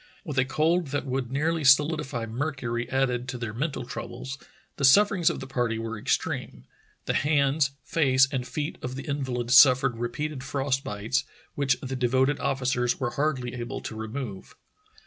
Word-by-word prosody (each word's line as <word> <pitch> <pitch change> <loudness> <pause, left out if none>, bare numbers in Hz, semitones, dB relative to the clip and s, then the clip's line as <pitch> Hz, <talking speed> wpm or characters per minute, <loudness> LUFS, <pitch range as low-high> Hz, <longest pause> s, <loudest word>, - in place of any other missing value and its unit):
With 145 -6 -1
a 130 - +3
cold 160 +5 +1
that 145 +1 -2
would 130 -2 -3
nearly 160 +3 0
solidify 140 -3 +3
mercury 120 -1 -3
added 125 -2 0
to 130 - -4
their 120 -3 -5
mental 135 0 -3
troubles, 135 +2 -7 0.4
the - - -4
sufferings 185 +5 +5
of - - -3
the - - -5
party 120 -4 -1
were 115 0 -4
extreme. 65 - -2 0.4
The - - 0
hands, 145 0 +2
face, 135 -4 +3
and 125 -3 -2
feet 145 +4 -4
of 125 +1 -5
the 135 - -6
invahd 130 -5 -3
suf 130 0 +8
fered 135 -2 +1
repeated 135 +3 -3
frost 135 -1 -1
bites, 110 +7 -1 0.3
which 140 -2 +1
the 130 -1 -4
devoted 130 +3 +2
officers 125 -2 0
were 120 -2 -1
hardly 140 -4 -1
able 120 -1 -5
to 110 - -6
remove. 110 -2 -6
130 Hz, 165 wpm, -26 LUFS, 120-145 Hz, 0.4 s, suf